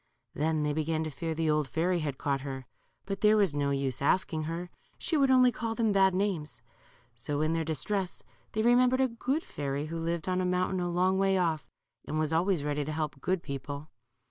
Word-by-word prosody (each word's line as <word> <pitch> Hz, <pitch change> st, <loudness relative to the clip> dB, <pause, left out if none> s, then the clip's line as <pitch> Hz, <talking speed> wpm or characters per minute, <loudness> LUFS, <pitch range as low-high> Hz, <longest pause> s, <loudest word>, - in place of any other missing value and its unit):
Then 155 Hz, 0 st, 0 dB
they 150 Hz, 0 st, 0 dB
began 155 Hz, +1 st, 0 dB
to 155 Hz, -, -4 dB
fear 160 Hz, +3 st, -3 dB
the 160 Hz, -1 st, +1 dB
old 150 Hz, -2 st, +1 dB
fairy 175 Hz, +5 st, 0 dB
had 145 Hz, -4 st, -3 dB
caught 140 Hz, -3 st, -1 dB
her, 135 Hz, -2 st, -6 dB, 0.4 s
but 195 Hz, 0 st, -4 dB
there 215 Hz, 0 st, +5 dB
was 195 Hz, -7 st, +3 dB
no 145 Hz, -1 st, 0 dB
use 135 Hz, -2 st, -1 dB
asking 155 Hz, +1 st, +1 dB
her. 170 Hz, +2 st, -4 dB, 0.3 s
She 330 Hz, -, -1 dB
would 275 Hz, -3 st, +4 dB
only 255 Hz, -1 st, +6 dB
call 225 Hz, -1 st, -3 dB
them 225 Hz, -2 st, +2 dB
bad 190 Hz, -2 st, +4 dB
names. 170 Hz, -, -2 dB, 0.5 s
So 145 Hz, +5 st, -3 dB
in 155 Hz, +1 st, +1 dB
their 165 Hz, 0 st, 0 dB
distress 180 Hz, +5 st, -2 dB, 0.3 s
they 220 Hz, -, 0 dB
remembered 250 Hz, +2 st, +4 dB
a 265 Hz, -, +4 dB
good 260 Hz, +6 st, -2 dB
fairy 140 Hz, 0 st, -3 dB
who 165 Hz, +1 st, -4 dB
lived 165 Hz, 0 st, -2 dB
on 185 Hz, 0 st, +1 dB
a -, -, 0 dB
mountain 180 Hz, +1 st, 0 dB
a 175 Hz, 0 st, -1 dB
long 185 Hz, +2 st, +2 dB
way 195 Hz, 0 st, +3 dB
off, 165 Hz, -4 st, 0 dB, 0.4 s
and 155 Hz, -, -3 dB
was 155 Hz, 0 st, 0 dB
always 170 Hz, -1 st, +2 dB
ready 150 Hz, 0 st, -1 dB
to 150 Hz, -, -4 dB
help 150 Hz, -3 st, -3 dB
good 185 Hz, +2 st, 0 dB
people. 140 Hz, +2 st, -6 dB
165 Hz, 215 wpm, -30 LUFS, 150-190 Hz, 0.5 s, only